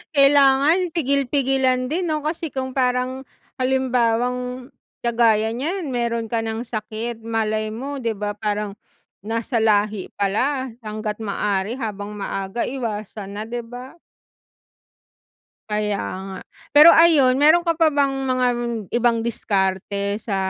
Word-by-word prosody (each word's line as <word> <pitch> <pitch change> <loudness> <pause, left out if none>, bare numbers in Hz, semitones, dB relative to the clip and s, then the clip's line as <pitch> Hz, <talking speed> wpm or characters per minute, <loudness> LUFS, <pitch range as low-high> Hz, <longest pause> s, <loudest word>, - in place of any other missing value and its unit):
kailangan 285 +5 +5
pigil-pigilan 270 -4 +1
din, 340 +3 -2
'no, 310 - 0
kasi 320 0 -3
kung 260 0 -4
parang 255 0 0 0.3
halimbawang 250 0 0 0.3
kagaya 225 -2 +3
niyan 325 +6 -3
meron 235 -1 -1
ka 225 0 -1
ng 225 +1 -4
sakit, 225 +1 -5
malay 215 -1 -1
mo, 270 +4 -5
'di 230 - 0
ba? 205 0 -3
Parang 210 -1 -3 0.5
nasa 230 +2 -1
lahi 210 -2 +1
pala, 260 +7 0 0.2
hanggat 215 0 -4
maaari 205 +3 -1
habang 210 -3 -4
maaga 195 +2 -3
iwasan 210 -5 -5
na, - - -3
'di 240 0 -4
ba? 245 +5 -10 1.7
Kaya 210 -1 0 0.3
nga. 190 - -7 0.4
Pero, 305 +3 +10
ayun, 310 -6 +6
meron 315 +4 +5
ka 335 - +2
pa 325 - +6
bang 285 -2 +2 0.2
mga 255 -1 +1 0.5
ibang 235 -1 +2
diskarte 200 -2 -1
sa, 210 -2 -3
235 Hz, 125 wpm, -22 LUFS, 215-270 Hz, 1.7 s, Pero